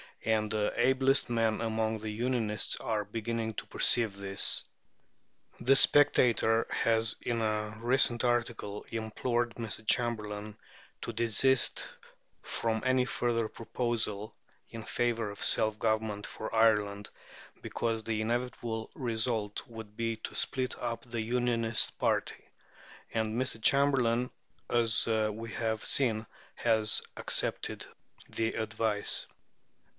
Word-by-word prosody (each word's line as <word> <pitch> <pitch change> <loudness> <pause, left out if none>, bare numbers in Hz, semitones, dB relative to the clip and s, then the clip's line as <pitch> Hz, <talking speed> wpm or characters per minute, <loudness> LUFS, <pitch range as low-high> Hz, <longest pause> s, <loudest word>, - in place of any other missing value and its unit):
And 110 -1 +1
the 105 -1 0
ablest 130 +1 +3
men 115 -2 +1
among 110 -1 -1
the 110 0 -5
"Unionists" 110 -1 -1
are 110 -2 -2
beginning 115 +1 -3
to - - -5
perceive 115 -5 +4
this. 100 0 0 1.0
The 130 +3 +4
Spectator 125 -6 +4
has 115 -1 +1
in 115 -1 -1
a 105 0 -1
recent 120 0 +3
article 120 -4 -1
implored 120 +2 -2
Mr. 110 -1 -5
Chamberlain 105 -3 -1 0.4
to 115 - -5
desist 115 +3 +3 0.6
from 110 -1 -2
any 130 -1 +3
further 120 -3 0
proposal 110 -2 -3 0.3
in 115 -1 -8
favour 115 -3 -1
of 100 - -5
self 110 -1 +2
government 110 -2 -1
for 110 - -7
Ireland, 105 -2 +2 0.5
because 115 -1 -2
the 110 0 -1
inevitable 115 -1 -3
result 115 -3 -1
would 110 -3 -10
be 115 -1 -1
to - - -8
split 130 -1 -1
up 115 -1 -3
the 120 -2 -4
Unionist 115 -1 +1
party; - - 0 0.7
and 110 +1 -1
Mr. 130 -3 -2
Chamberlain, 125 -2 +3 0.4
as 115 -2 +2
we 110 0 -1
have 110 -2 -2
seen, 115 -5 +1 0.3
has 110 -2 +1 0.2
accepted - - 0 0.4
the 115 0 -1
advice. 110 -2 0
115 Hz, 115 wpm, -30 LUFS, 110-120 Hz, 1.0 s, perceive